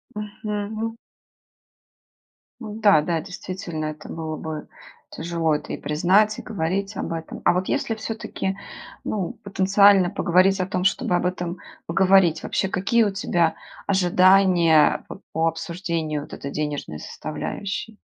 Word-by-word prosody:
Мгм. 210 +1 -4 1.6
М-да, 210 -6 +3
да, 165 +1 -1
действительно, 180 -3 -6
это 155 0 -6
было 160 -1 -4
бы 155 -1 -6 0.4
тяжело 165 -2 -1
это - - -6
и - - -3
признать, 185 +8 +2
и - - -5
говорить 195 +1 -2
об - - -3
этом. 165 -1 -6
А - - +6
вот 180 +1 -1
если 225 - 0
всё-таки, 220 -3 -4 0.5
ну, 195 -5 -2
потенциально 195 -1 +5
поговорить 190 +1 +3
о 185 - +1
том, 180 -1 -2
чтобы 185 -2 +1
об 175 - 0
этом 180 -1 -3 0.3
поговорить, 185 -2 +4
вообще 190 - 0
какие 195 +5 +2
у 205 - +1
тебя 175 -4 +1 0.3
ожидания 185 -4 +4
по 195 - -10
по 160 +1 +2
обсуждению 165 -2 -2
вот 145 - -11
этой 140 - -6
денежной 145 - -3
составляющей? 210 +2 -5
185 Hz, 130 wpm, -23 LUFS, 165-200 Hz, 1.6 s, А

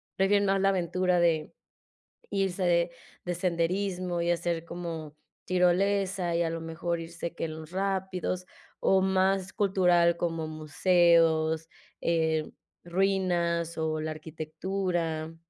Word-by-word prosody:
¿Prefieren 200 +1 +3
más 195 0 +2
la 195 - +4
aventura 180 -1 +1
de 165 -3 +1 0.8
irse 195 -2 -1
de 170 0 +3 0.3
de 175 0 -2
senderismo 180 0 -1
y 170 0 +1
hacer 170 -1 -1
como 165 -3 -6 0.3
tirolesa, 185 0 +2
y 170 - +2
a 165 - 0
lo 165 0 -4
mejor 165 +1 -3
irse 170 0 -6
que - - -3
en 155 - -6
los 160 0 -10
rápidos, 190 -1 -2 0.3
o 190 - +4
más 190 0 +1
cultural, 180 -4 +3
como 165 -2 -2
museos, 160 0 +3 0.3
em, 160 -2 +1 0.3
ruinas 175 -2 0
o 155 -1 -1
la 155 0 -3
arquitectura? 160 +1 -3
175 Hz, 125 wpm, -28 LUFS, 165-185 Hz, 0.8 s, la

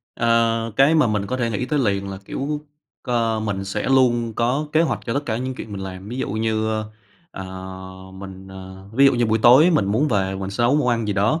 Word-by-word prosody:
Ờ, 115 -1 +1
cái 140 +4 +5
mà 150 -6 +4
mình 105 -2 -1
có 130 - -2
thể 120 -2 -1
nghĩ 115 +3 -2
tới 150 +2 0
liền 100 -5 0
là, 95 - -6
kiểu, 145 +6 -3 0.4
ơ, 115 -2 0
mình 100 -3 -3
sẽ 100 +2 -3
luôn 120 -3 +3
có 125 +6 0
kế 160 +1 +4
hoạch 165 - 0
cho 115 - -2
tất 140 - 0
cả 110 - -1
những 130 +2 -3
chuyện 110 - -8
mình 100 - -5
làm. 95 +1 -8
Ví 120 - -5
dụ - - -2
như, 110 +1 -1
ơ, 110 -1 -2 0.4
ờ, 95 - -7 0.7
mình 95 0 -10
ờ, 95 0 -11
ví 140 +4 +5
dụ - - +5
như 120 -1 +1
buổi 110 +1 +1
tối 140 +9 +7
mình 150 - +2
muốn 110 +10 +1
về 95 -5 0
mình 95 0 -5
sẽ 100 +4 -2
nấu 130 +4 +3
món 145 -4 +1
ăn 115 -2 0
gì 105 - 0
đó, 105 +11 +1
115 Hz, 245 wpm, -22 LUFS, 100-125 Hz, 0.7 s, tối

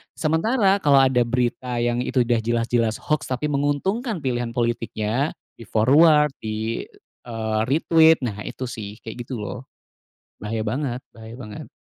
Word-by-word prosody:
sementara 195 +6 +2
kalau 140 -2 +6
ada 130 -2 +4
berita 125 0 -1
yang 120 +1 0
itu 125 +1 0
udah 120 -1 +1
jelas-jelas 115 -1 0
hoax, 150 -2 -1
tapi 130 +4 -1
menguntungkan 165 - -1
pilihan 120 -4 -2
politiknya, 120 +2 -1 0.2
di - - -12
forward, 150 +7 +5
di, 110 +1 -3 0.4
eee, 110 -2 -2
retweet, 160 +3 +5
nah 105 -1 -5
itu 130 - -5
sih 105 -2 -7
kayak 115 +2 -7
gitu 125 -4 -5
loh, 115 +4 -6 0.8
bahaya 110 +2 -3
banget 125 +2 -2
bahaya 110 +1 -11
banget. 110 -5 -9
125 Hz, 140 wpm, -23 LUFS, 115-145 Hz, 0.8 s, kalau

